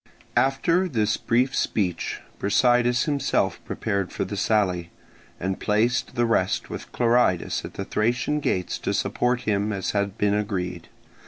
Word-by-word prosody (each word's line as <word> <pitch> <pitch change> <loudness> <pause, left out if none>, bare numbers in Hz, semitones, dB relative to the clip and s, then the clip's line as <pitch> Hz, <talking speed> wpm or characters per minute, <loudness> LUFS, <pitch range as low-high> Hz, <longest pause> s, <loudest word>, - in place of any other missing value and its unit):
After 165 +7 +2
this 110 -7 +1
brief 125 +3 +1
speech 90 -6 -1 0.2
Brasidas 120 +3 +3
himself 145 -3 0
prepared 100 -4 -2
for - - -2
the - - -5
sally, 90 -6 +1 0.5
and 95 +1 -2
placed 115 +4 +1
the 120 -1 +2
rest 95 -5 0
with - - -7
Clearidas 120 -7 +2
at - - -8
the - - -4
Thracian 120 +7 0
gates 90 -10 -1
to - - -1
support 125 0 0
him 105 0 0
as 100 -2 -2
had 100 0 -1
been 105 0 +2
agreed. 90 -5 -2
110 Hz, 145 wpm, -25 LUFS, 100-125 Hz, 0.5 s, Brasidas